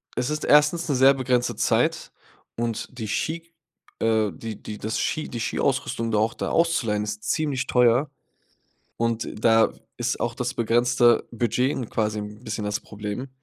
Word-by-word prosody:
es 125 +2 -1
ist 150 0 -2
1. 150 +4 +4
'ne 140 - +2
sehr 135 +2 +6
begrenzte 125 -2 0
Zeit - - +1 0.5
und 115 -1 -2
die 110 -3 -4
Ski, 165 +8 -3 0.5
äh 110 -3 +2
die 110 +6 -7
die 105 - -7
das 110 +2 -3
Ski 155 - -1
die 120 - -5
Skiausrüstung 115 +1 -1
da 105 - +2
auch 110 +2 +1
da - - -3
auszuleihen, 125 -12 +1
ist 105 0 -5
ziemlich 145 -4 -1
teuer. 125 +3 +3 0.9
Und 115 -1 -1 0.2
da 115 -1 +5 0.3
ist 120 0 -1
auch 120 - -1
das 125 +2 -3
begrenzte 120 +1 +3
Budget 120 +3 +1
'n 125 -4 -4
quasi 110 -1 -1
'n 105 +2 -8
bisschen 110 -2 -4
das 105 +1 -1
Problem. 105 +5 -6
120 Hz, 165 wpm, -24 LUFS, 110-130 Hz, 0.9 s, sehr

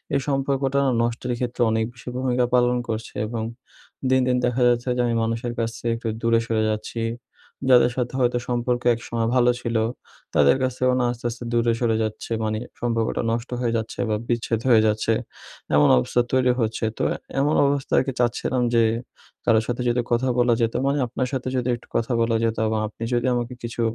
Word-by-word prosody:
এই - - +3
সম্পর্কটা 135 0 0 0.2
নষ্টের 120 +1 -1
ক্ষেত্রে 125 -1 -3
অনেক 110 0 +1
বেশি 125 +1 -9
ভূমিকা 125 -1 +1
পালন 125 0 +3
করছে, 110 0 -4
এবং 115 -1 -3 0.7
দিন, 130 0 +4
দিন 125 0 +2
দেখা 125 +1 0
যাচ্ছে 120 +1 0
যে, - - +2
আমি 115 - 0
মানুষের 115 +1 -2
কাছ 115 - 0
থেকে 115 - -1
একটু 115 0 -6
দূরে 115 0 +3
সরে 110 -1 +1
যাচ্ছি। 110 +2 -4 0.7
যাদের 125 -1 +6
সাথে 125 0 -1
হয়তো 125 -1 +2
সম্পর্কে 120 0 0
একসময় 115 -1 -3
ভালো 125 -1 +5
ছিলো, 115 -2 0 0.5
তাদের 70 - +5
কাছেও 130 0 +1
না 125 - +2
আস্তে, 120 0 -9
আস্তে 120 +1 -7
দূরে 115 0 +2
সরে 115 -2 +1
যাচ্ছে, 110 +1 -5
মানে, 110 0 -1 0.2
সম্পর্কটা 115 -2 0
নষ্ট 115 +2 -3
হয়ে 115 -2 0
যাচ্ছে 110 0 -5
বা 105 - +1
বিচ্ছেদ 115 -1 0
হয়ে 115 -3 +6
যাচ্ছে। 110 +1 +1 0.6
এমন 75 0 +6
অবস্থা 65 - +2
তৈরি 130 -1 +3
হচ্ছে। 110 0 -1
তো - - -1 0.4
এমন 145 +2 +2
অবস্থায়কে 140 -1 +1
চাচ্ছিলাম 125 +1 0
যে, 115 - +5 0.6
কারো 115 -2 +5
সাথে 120 0 -2
যদি 120 +1 +1
কথা 120 +2 +2
বলা 120 -1 +4
যেতো, 115 0 +1
মানে 140 - +1
আপনার 125 +2 -2
সাথে 130 -1 -2
যদি 125 0 -1
একটু 120 - -16
কথা 115 +2 0
বলা 115 0 +2
যেতো 110 -1 -1
বা 110 - 0
আপনি 110 - -9
যদি 120 +1 +1
আমাকে 120 +1 -2
কিছু 115 0 -4
120 Hz, 190 wpm, -23 LUFS, 115-125 Hz, 0.7 s, যাদের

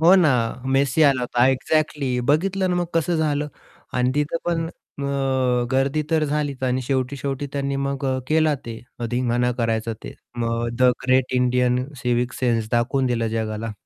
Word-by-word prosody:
हो, 170 +4 +7
ना! 175 -5 +5 0.4
मेसी 140 +3 +3
आला 140 -4 +4
होता 120 0 +2
एक्झॅक्टली 135 -1 0
बघितलं 190 +6 +2
ना 180 - +1
मग 175 - +1
कसं 165 +1 +1
झालं? 150 -2 0 0.4
आणि 125 0 +1
तिथे 150 +2 0
पण 165 -1 0 0.3
अ 130 -3 0
गर्दी 135 +3 +1
तर 160 -1 +3
झालीच, 145 -2 -2
आणि 130 0 0
शेवटी 130 +1 -1
शेवटी 140 +1 -3
त्यांनी 140 -1 -1
मग 140 0 -2 0.2
केला 155 -1 +3
ते, 115 -1 -6 0.3
धिंगाणा 125 0 +1
करायचा 115 -1 0
ते. - - -8 0.2
मग 115 0 -1
the 125 0 +5 0.2
great 130 0 +3
Indian 125 0 +2 0.2
civic 125 0 0
sense 115 -4 0
दाखवून 130 +3 +1
दिलं 120 -2 0
जगाला. 110 0 -3
130 Hz, 160 wpm, -22 LUFS, 125-145 Hz, 0.4 s, हो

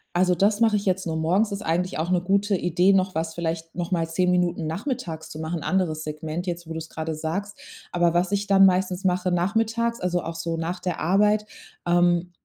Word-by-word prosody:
Also, 180 0 +3
das 205 +5 +2
mache 220 -2 +4
ich 200 - -4
jetzt 190 0 0
nur 160 -1 -2
morgens. 185 +7 +1
Ist 200 +1 -4
eigentlich 175 -1 -1
auch 165 +2 -1
'ne 180 -1 +2
gute 200 +2 +1
Idee, 180 +2 +3
noch 185 -2 +1
was 160 0 -2
vielleicht 165 -1 -4
noch 175 0 -3
mal 165 -2 +1
10 180 +2 +1
Minuten 175 -2 +1
nachmittags 165 - -4
zu 155 - -8
machen, 160 +1 -3
anderes 170 -5 -1
Segment 155 +3 -5
jetzt, 170 -1 -4
wo - - -4
du's 160 0 -5
grade 160 0 -4
sagst. 195 +7 -4 0.3
Aber 175 -1 +2
was 175 +2 +1
ich 205 0 -1
dann 195 -1 +6
meistens 185 0 +1
mache 185 0 +1
nachmittags, 225 +6 0
also 180 -1 -1
auch 165 - -5
so 165 0 -3
nach 165 +2 -3
der 180 -3 -3
Arbeit, 210 +4 +3 0.4
ähm, 175 0 +2
180 Hz, 210 wpm, -24 LUFS, 165-195 Hz, 0.4 s, dann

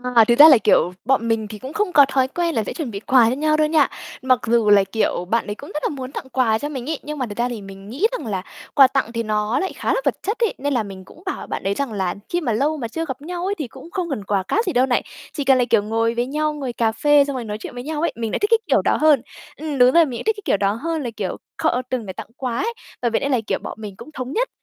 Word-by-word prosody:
À, 230 -1 +8
thực 240 +2 +3
ra 305 - +12
là, 275 - +8
kiểu, 205 -4 +3
bọn 245 -2 +2
mình 225 -2 0
thì 210 0 -9
cũng 260 +5 -8
không 415 +2 0
có 285 -2 +8
thói 265 -1 +2
quen 340 +3 -2
là 220 - +1
sẽ - - -5
chuẩn 300 -8 -4
bị 200 - -5
quà 235 +1 +4
cho 250 - -1
nhau 305 +2 +1
đâu 305 0 +3
nha. 305 -3 +4 0.3
Mặc 255 -2 +3
dù 230 -2 +3
là, 205 -1 +7
kiểu, 195 -2 -1
bạn 230 +6 0
ấy 205 - -3
cũng 285 - -11
rất 300 - -3
là - - +1
muốn 265 -3 -6
tặng 265 - -7
quà 235 -4 +2
cho 290 - -4
mình 265 -2 -5
ấy, 315 - -2
nhưng 300 +1 -5
mà 260 - -1
thật 205 -3 -8
ra 240 +1 0
thì 235 -4 -5
mình 195 0 -11
nghĩ 290 - +1
rằng - - -5
là 195 -4 -2 0.3
quà 270 -2 +8
tặng 255 -4 -1
thì 230 0 -1
nó 215 +1 0
lại 380 - -2
khá - - -1
là - - 0
vật - - +2
chất 420 +4 -2
ấy, 460 -3 +1
nên 285 +1 -1
là 240 -4 +1
mình 190 -2 -10
cũng 330 - -17
bảo 385 - -4
bạn - - -4
ấy 195 - 0
rằng 275 +3 -3
là 190 -3 -1
khi 350 - 0
mà 250 - -1
lâu 290 +8 +1
mà 240 -5 -4
chưa 325 +8 -4
gặp 265 -2 -6
nhau 350 +3 -5
ấy 400 +1 -1
thì 295 - -4
cũng 265 +8 -13
không 365 -3 -3
cần 265 -8 -3
quà 200 -1 0
cáp 435 - 0
gì 365 - -1
đâu 250 +1 +4
này. 250 -2 +1 0.3
Chỉ 290 - -2
cần 265 -1 +5
là, 250 - +2
kiểu, 220 -3 +4
ngồi 225 +2 0
với 240 +1 0
nhau, 305 +3 -1
ngồi 270 -5 -4
cà 230 -2 +1
phê 290 +4 +4
xong 280 -1 -4
rồi 250 - -3
nói 210 -1 -4
chuyện 215 - -8
với 245 0 -6
nhau 305 +1 -3
ấy, 335 - +1
mình 225 -2 -3
lại - - -1
thích 415 - +1
cái 455 - +6
kiểu - - +3
đó - - +1
hơn. 305 -5 +5 0.4
Ừm, 300 -1 -4
đúng 250 0 +6
rồi, 335 +2 +6
mình 250 -5 -5
lại - - -6
thích 440 0 +2
cái - - -8
kiểu 205 - +2
đó 200 0 +1
hơn 320 +7 -3
là, 245 - -3
kiểu, 190 -3 -3 0.2
kho, - - +2
ơ, 250 - 0
từng 250 -4 -2
để 190 - -6
tặng - - -8
quà 250 -3 -3
ấy, 460 +4 -1 0.3
bởi 240 -2 +1
vậy - - +2
nên 280 - -2
là, 255 - +3
kiểu, - - 0
bọn - - -6
mình 210 -2 -6
cũng - - -11
thống 255 -1 -5
nhất - - 0
255 Hz, 330 wpm, -21 LUFS, 225-305 Hz, 0.4 s, ra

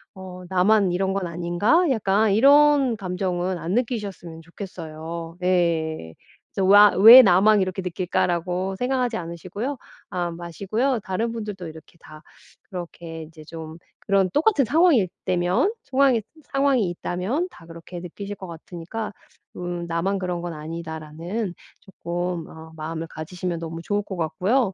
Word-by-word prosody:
‘어 185 -1 -9
나만 190 +1 +3
이런 190 +2 0
건 195 -3 -2
아닌가?‘ 175 - +2
약간 210 -2 +2
이런 280 0 +5
감정은 180 -1 -2
안 170 +3 -3
느끼셨으면 205 -9 -3
좋겠어요. 165 -1 -8
네. 165 - 0 0.4
그래서 190 - 0
와 205 +1 +8
‘왜 230 +6 +11
나만 200 +1 +5
이렇게 185 +1 -2
느낄까.‘라고 180 +1 -1
생각하지 250 -2 0
않으시고요 185 - -5 0.3
아 175 -1 -2
마시고요. 200 - -2
다른 220 +5 -2
분들도 210 -6 -6
이렇게 160 +2 -14
다 155 0 -13 0.5
그렇게 170 -2 -7
이제 155 0 -13
좀 160 0 -9 0.2
그런 195 -2 +2
똑같은 300 - +3
상황일 305 - +4 0.2
때면 180 - +1
상황이 260 -4 +3 0.3
상황이 275 -8 +2
있다면 190 - -2
다 165 - -15
그렇게 170 +1 -9
느끼실 200 +3 -7
것 190 - -9
같으니까 175 +6 -7 0.4
음 175 -1 -4
‘나만 185 +4 -1
그런 180 -2 -3
건 175 -1 -5
아니다.‘라는 165 +5 -5 0.5
쪼끔 175 -1 -3
어 160 0 -12
마음을 160 +1 -5
가지시면 170 +2 -5
너무 165 0 -6
좋을 205 +3 0
것 190 -3 -7
같고요. 195 +7 +1
180 Hz, 320 characters per minute, -23 LUFS, 170-210 Hz, 0.5 s, 왜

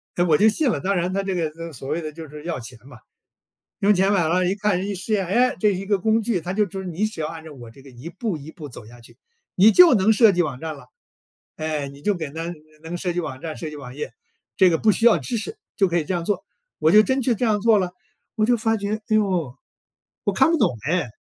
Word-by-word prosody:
哎， 175 - +2
我 155 -4 +4
就 220 +1 +5
信 280 +5 +1
了， - - 0
当 195 +1 0
然 180 +1 -1
他 195 0 -1
这 195 -1 -2
个 165 0 -4
所 135 +1 -7
谓 160 +3 -1
的 155 -1 -5
就 160 0 -9
是 150 +1 -10
要 165 -5 -3
钱 115 +1 -10
嘛， 125 -5 -14 0.8
用 205 +1 +4
钱 190 +2 +2
买 180 -5 +2
了 180 +2 +2
一 190 - 0
看 205 -3 0
一 200 - -3
试 190 +4 -3
验， 195 -3 +1
唉， 245 +7 +2
这 210 - +3
一 190 +2 -5
个 200 -1 +1
工 220 +3 +2
具， 215 -5 -1
他 175 - -5
就 210 -1 +1
说 190 +2 -6
你 180 +3 -2
只 215 -7 -5
要 150 - -1
按 160 0 -8
照 155 - -10
我 120 -4 -11
这 135 - -17
个 135 - -15
一 125 +7 -9
步 190 -2 -3
一 150 +2 -10
步 155 -5 -9
走 120 -4 -11
下 120 +1 -14
去， 115 - -17 0.4
你 205 +4 +7
就 355 +1 +8
能 215 0 +4
设 220 -1 +6
计 175 - +2
网 135 -6 -3
站 160 -1 -5
了。 140 - -15 0.7
唉， 155 -3 -2
你 140 +1 -14
就 205 +6 +1
给 160 -5 -5
他 165 +3 -5 0.3
能 170 +2 -5
设 175 0 -2
计 175 - -1
网 130 -5 -6
站、 160 -2 -5
设 160 - -5
计 150 - -9
网 130 -2 -10
页， 150 - -5 0.5
这 190 -2 +6
个 165 - +2
不 220 - +4
需 225 +4 0
要 235 - +6
知 240 - -3
识 420 - -6 0.2
就 195 - +4
可 175 0 0
以 - - -2
这 185 - -2
样 170 -1 -3
做， 200 -1 -1 0.4
我 160 - +3
就 210 +3 +7
真 260 +3 0
去 240 -1 +1
这 245 - -1
样 210 -2 +1
做 225 -1 +5
了， 185 -3 -1 0.4
我 215 - 0
就 240 0 +3
发 225 0 +1
觉， 205 +1 -2
哎 215 - +2
呦， 180 - 0 0.7
我 - - 0
看 - - +4
不 330 - +2
懂 130 - +2
唉， 170 -7 0
180 Hz, 295 characters per minute, -22 LUFS, 155-210 Hz, 0.8 s, 就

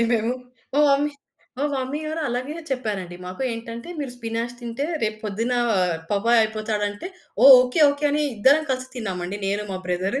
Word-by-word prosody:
తిన్నామండి 230 - +4
మేము. 225 +2 +1 0.4
మా 290 - +4
మమ్మీ 285 +2 +2 0.5
మా 285 - 0
మమ్మీగారలాగే 285 -1 -3 0.2
చెప్పారండి 205 -9 -3
మాకు. 185 +8 -6
ఏంటంటే 230 +3 -7
మీరు 270 -4 -4
స్పినాచ్ 230 0 -3
తింటే 240 +4 -3 0.2
రేపు 215 0 -1
పొద్దున 225 +4 -1 0.6
పపాయ్ 225 +3 +4
అయిపోతాడంటే 215 - -2 0.4
ఓహ్! 270 -1 +12
ఓకే. 250 +5 -1
ఓకే. 285 +1 -4
అని 300 - +1
ఇద్దరం 275 +9 +5
కలిసి 255 0 -2
తిన్నామండి 190 -4 -4
నేను 200 +2 0
మా 185 - -3
బ్రదరు. 185 +9 -1
230 Hz, 155 wpm, -23 LUFS, 210-265 Hz, 0.6 s, ఓహ్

